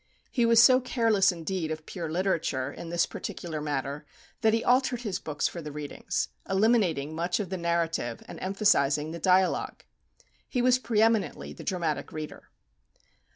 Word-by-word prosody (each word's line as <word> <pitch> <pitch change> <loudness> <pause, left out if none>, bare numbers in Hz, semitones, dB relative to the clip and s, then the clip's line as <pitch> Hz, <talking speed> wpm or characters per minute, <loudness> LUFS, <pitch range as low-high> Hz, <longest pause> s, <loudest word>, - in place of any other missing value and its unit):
He 240 -3 +2
was 230 -1 +6
so 255 +2 +8
careless 225 -6 +3
indeed 170 -1 -3
of 155 0 -5
pure 170 -4 -5
literature, 160 -7 -1
in 170 - -8
this 170 0 +2
particular 160 -3 -6
matter, 145 0 -3 0.4
that 220 -1 +4
he 225 +1 +1
altered 250 -1 +2
his 200 -6 -3
books 155 -5 -1
for 170 - -6
the 150 -1 -7
readings, 145 0 -3 0.2
eliminating 190 - +2
much 170 +4 -1
of 205 - -3
the - - -1
narrative, 170 -8 -1
and - - -9
emphasizing 160 -7 +2
the 170 - -6
dialogue. 185 0 +2 0.7
He 250 - -1
was 250 +1 +4
pre 225 -3 +2
eminently 225 -2 0
the - - -10
dramatic 170 -5 -2
reader. 155 -1 -8
180 Hz, 160 wpm, -28 LUFS, 155-220 Hz, 0.7 s, so